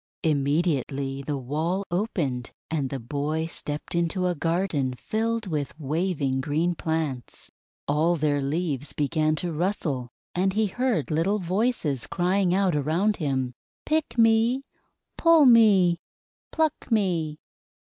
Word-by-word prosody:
Immediately 140 -2 0
the 145 +1 -3
wall 160 +9 -2
opened, 170 - -1 0.2
and 145 -5 -1
the 135 - -3
boy 145 +6 -2
stepped 150 -2 -6
into 170 +2 0
a 180 - +2
garden 165 -5 -1
filled 225 - -2
with 150 -3 -3
waving 150 -3 -1
green 160 +6 0
plants. 160 -6 -4 0.4
All 155 +4 +2
their 145 -2 +1
leaves 145 -1 -2
began 155 +1 +1
to 175 +1 -1
rustle, 150 -7 -1 0.2
and 190 +2 +1
he 220 +2 +2
heard 220 - -1
little 170 +7 +1
voices 185 - -1
crying 185 +1 +1
out 190 -2 +2
around 165 +9 +1
him: 130 -6 -1 0.3
"Pick 305 -6 -1
me!' 230 +3 +4 0.5
"Pull 330 -3 +6
me!" 205 -8 +6 0.5
"Pluck 315 -4 -1
me!" 175 -9 +1
165 Hz, 125 wpm, -26 LUFS, 145-195 Hz, 0.5 s, Pull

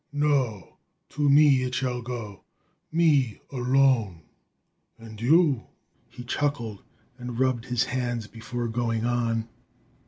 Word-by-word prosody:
No! 140 - -1 0.3
To 145 -1 0
me 140 -2 +6
it 130 0 -2
shall 125 -1 -1
go 115 -5 -7 0.5
me 150 -8 +2
alone! 125 - +2 0.7
And 110 -1 -12
you 145 0 +3 0.2
" - - -40
He 125 - -10
chuckled 120 -5 -2 0.4
and 125 -1 -6
rubbed 130 -2 0
his 125 -1 +1
hands 120 -3 -2
before 120 +2 -5
going 115 -1 -1
on. 115 -2 0
125 Hz, 120 wpm, -26 LUFS, 115-135 Hz, 0.7 s, me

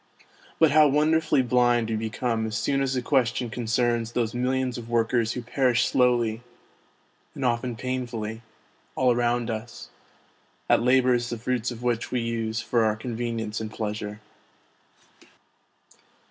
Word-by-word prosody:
But 160 -3 +4
how 155 0 +6
wonder 155 +3 +3
fully 155 -4 +2
blind 120 -1 +2
we - - 0
become 110 +1 -2
as 110 +1 -3
soon 135 +4 0
as 135 -1 0
the 125 - -1
question 125 -3 +1
concerns 120 0 0
those 115 -2 -1
millions 125 0 -1
of 115 -1 -10
workers 115 0 +1
who 125 - -5
perish 125 -1 +2
slowly, 120 -3 +2 0.9
and 135 - -3
often 120 0 0
painfully, 115 -2 -4 0.5
all 130 -1 +3
around 120 -1 0
us, 110 +2 -7 0.8
at - - +4
labours 125 -1 +3
the 120 - -3
fruits 120 +1 -1
of 120 -1 -8
which 120 -2 -1
we 125 - -1
use 115 -1 -2
for 115 0 +1
our 110 -1 +2
con 115 +2 -6
venience 115 -2 -3
and 110 - -4
pleasure. 105 -1 -5
120 Hz, 145 wpm, -25 LUFS, 115-125 Hz, 0.9 s, how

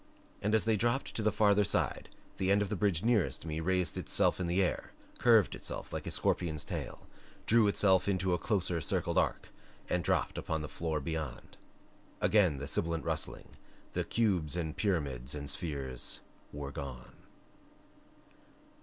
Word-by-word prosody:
And 105 +2 +2
as 110 - +2
they 110 -1 +3
dropped 120 +5 0
to - - -2
the 110 0 +2
farther 105 0 +4
side - - -1 0.3
the 95 - 0
end 100 +1 +4
of 100 - -4
the 105 - -1
bridge 95 -3 +1
nearest 115 -8 +1
me 80 0 -3
raised 90 -1 0
itself - - +3
in 90 -2 -1
air, 90 +1 0 0.3
curved 115 -6 +5
itself - - -6
like - - -4
a - - -3
scorpion's 80 -4 0
tail, - - -6 0.4
drew 115 -1 +5
itself 95 -2 +3
into 95 -2 +1
a 90 - +1
closer 90 -5 0
circled 70 - +1
arc, - - -1 0.4
and 90 -1 0
dropped - - 0
upon 80 -1 -2
the - - -4
floor 80 -1 -2
beyond. 75 -4 -5 0.6
Again 95 -9 +3
the 70 +1 -5
sibilant 85 +1 -1
rustling - - -3 0.4
and - - -2
cubes 95 -10 +1
and 80 -3 -3
pyramids 70 - -1
and 70 -1 -5
spheres 70 -7 -1 0.3
were 70 -1 -6
gone. 65 -3 -7
90 Hz, 160 wpm, -32 LUFS, 75-105 Hz, 0.6 s, curved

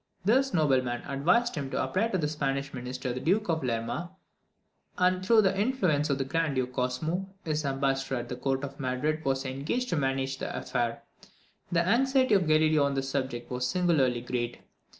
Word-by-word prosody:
This 265 +6 +3
nobleman 130 - +1
advised 175 - +2
him 140 -4 -4
to - - -1
apply 205 +5 +1
to 195 - -1
the 155 -4 0
Spanish 140 -2 -2
minister 125 0 -4
the 125 - -4
Duke 195 +7 +1
of 160 -2 0
Lerma; 120 +8 -2 0.9
and, 185 0 +2
through 220 +2 +5
the 190 0 +2
influence 190 - +1
of 140 - +1
the 135 - -1
Grand 155 +1 0
Duke 130 -1 -1
Cosmo, 155 +10 -2 0.2
his 155 -1 -1
ambassador 135 -1 0
at 120 -1 -4
the 125 - -4
court 135 +1 -1
of 140 +1 -6
Madrid 145 +4 -1
was 135 0 0
engaged 145 - -2
to - - 0
manage 135 -2 -1
the - - -4
affair. 120 -2 -2 0.7
The 170 0 +2
anxiety 260 +2 +3
of 185 -5 +3
Galileo 155 -1 +4
on 140 0 0
this 135 0 -2
subject 130 -4 -3
was 125 0 -1
singularly 150 -8 +2
great. 120 -1 -3
140 Hz, 185 wpm, -28 LUFS, 130-180 Hz, 0.9 s, through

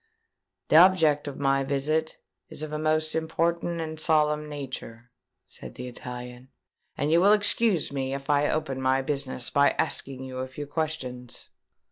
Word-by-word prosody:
"The 155 - +6
object 165 -5 +5
of 140 - -6
my 135 -1 +2
visit 150 +3 -1 0.3
is 155 - -7
of 155 -1 -6
a 150 - -2
most 155 0 0
important 170 +1 -1
and 160 -1 -5
solemn 150 -1 +1
nature," 125 -5 -8 0.3
said - - -12
the 125 - -7
Italian; 125 +1 -8 0.5
"and 145 +2 0
you 170 +1 +5
will 200 +3 +6
excuse 210 -5 +3
me 135 -1 -2
if 135 0 -8
I 145 0 +2
open 135 -4 -2
my 130 +1 +2
business 135 -3 -2
by 140 0 +3
asking 130 -1 -2
you 130 -1 -7
a 130 - -3
few 145 +3 -7
questions." 140 -5 -5
145 Hz, 160 wpm, -26 LUFS, 130-155 Hz, 0.5 s, The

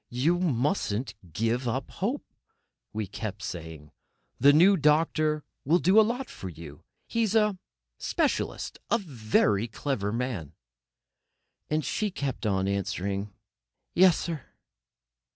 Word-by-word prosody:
"You 150 +9 +1
mustn't 135 - 0 0.2
give 115 +8 0
up 130 +3 -2
hope," 240 +9 -2 0.7
we 110 0 -2
kept 100 0 -6
on - - -2
saying: 80 -3 -7 0.5
"The 140 - +7
new 180 +7 +6
doctor 155 -1 +2 0.2
will 160 +6 +4
do 185 +4 +5
a - - +10
lot 240 +4 0
for 95 - -7
you; 80 -3 -11 0.2
he's 225 -2 0
a 210 -4 +3 0.4
specialist—a 230 - -1
very 115 - +1
clever 110 -3 -2
man." 115 - -3 1.2
And 155 0 0
she 215 -1 0
kept 140 - -3
on 95 -1 +1
answering: 100 +1 -2 0.6
"Yes, 180 -2 +6
sir." 165 -4 -4
130 Hz, 120 wpm, -28 LUFS, -, 1.2 s, a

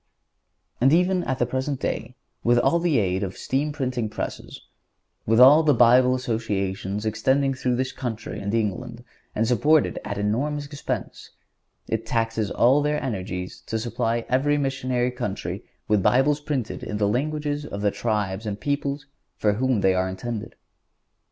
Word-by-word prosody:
(145) - - -34
And 135 +4 +5 0.3
even - - -4
at 130 - 0
the 120 - +1
present 130 +2 -2
day, - - -3 0.3
with 120 +1 +4
all 170 +7 +3
the 170 -5 +2
aid 95 -3 +1
of 95 -2 -4
steam 145 +3 -1
printing 130 -6 -2
presses, - - -6 0.7
with 115 +2 +4
all 140 +5 +9
the 150 -4 +3
Bible 125 +2 +5
Associations 105 -4 -2
extending 130 +6 +1
through 125 -1 -1
this 130 +1 -1
country 115 -4 -5
and 100 +1 -3
England, 115 +2 -2 0.3
and 110 +1 +1
supported 150 +6 +3
at 100 0 -4
enormous 135 +9 -1
expense, 145 0 -5 0.6
it 110 0 -1
taxes 115 -3 0
all 130 +8 +4
their 150 +1 0
energies 95 -6 -4
to 110 - -1
supply 115 0 -1
every 145 +3 +2
missionary 130 -3 0
country 105 -5 -4 0.2
with 105 -2 +3
Bibles 135 +7 +3
printed 145 -6 -3
in 105 - -4
the 105 -1 +1
languages 145 +5 -1
of 100 -7 -6
the 105 -1 +2
tribes 105 -2 -2
and 100 -1 -4
peoples 145 +1 -2 0.3
for 105 -1 +2
whom 125 0 +1
they 95 -1 +4
are 95 0 0
intended. 105 +4 -5
120 Hz, 160 wpm, -24 LUFS, 105-135 Hz, 0.7 s, all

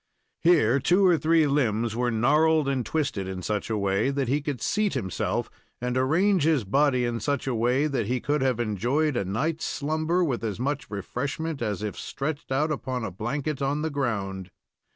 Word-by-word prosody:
Here 140 -7 +4
two 180 +8 +3
or 175 -4 +4
three 160 0 +4
limbs 120 -6 +1
were 120 +1 +1
gnarled 150 +6 +3
and 135 -3 0
twisted 135 -10 -2
in 95 -1 -5
such 105 +4 -2
a 110 - 0
way 100 +4 +1
that 140 -2 -1
he 140 +4 +1
could 140 -3 -3
seat 205 - 0
himself 95 -2 -2 0.3
and 125 0 -2
arrange 170 +9 +3
his 150 -4 +2
body 130 +4 +2
in 120 -1 -2
such 140 +5 -1
a 130 - -1
way 125 +5 +2
that 140 -8 -1
he 125 +2 0
could 145 +2 0
have 130 -3 +1
enjoyed 120 - 0
a 110 - 0
night's 145 - -2
slumber 155 +4 0
with 130 -8 -1
as 110 -2 -3
much 140 0 -2
refreshment 135 - -4
as 105 -2 -2
if 105 - -3
stretched 145 0 -4
out 150 +4 +1
upon 130 -4 -3
a 105 - -4
blanket 135 - -3
on 145 +2 0
the 160 - -1
ground. 100 -9 -2
135 Hz, 195 wpm, -26 LUFS, 115-150 Hz, 0.3 s, Here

